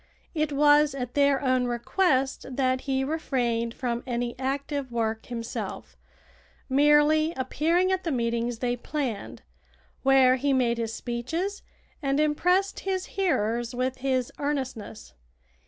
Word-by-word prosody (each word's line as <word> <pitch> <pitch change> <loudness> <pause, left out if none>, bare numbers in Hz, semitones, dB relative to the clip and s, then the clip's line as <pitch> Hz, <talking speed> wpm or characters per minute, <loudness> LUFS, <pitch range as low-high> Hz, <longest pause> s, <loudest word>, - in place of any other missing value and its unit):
It 305 -2 0
was 290 0 +4
at 250 -2 -4
their 280 -1 +3
own 255 -1 +2
request 265 +3 0
that 255 -1 +1
he 265 -1 -1
refrained 245 -6 -1
from 240 -2 -2
any 240 -1 -2
active 275 0 -2
work 225 -1 -2
himself, 230 -2 -5 0.7
merely 295 +3 +4
appearing 330 +8 +1
at 375 0 0
the 330 - -1
meetings 235 -1 -1
they 245 +1 -1
planned, 230 - -4 0.6
where 265 -1 +5
he 280 +2 +1
made 240 -3 +1
his 225 -1 -2
speeches 290 - -3 0.4
and 275 0 0
impressed 360 +6 +2
his 380 -1 -2
hearers 240 - 0
with 255 +1 -1
his 255 -2 -1
earnestness. 260 - -4
265 Hz, 125 wpm, -26 LUFS, 240-295 Hz, 0.7 s, where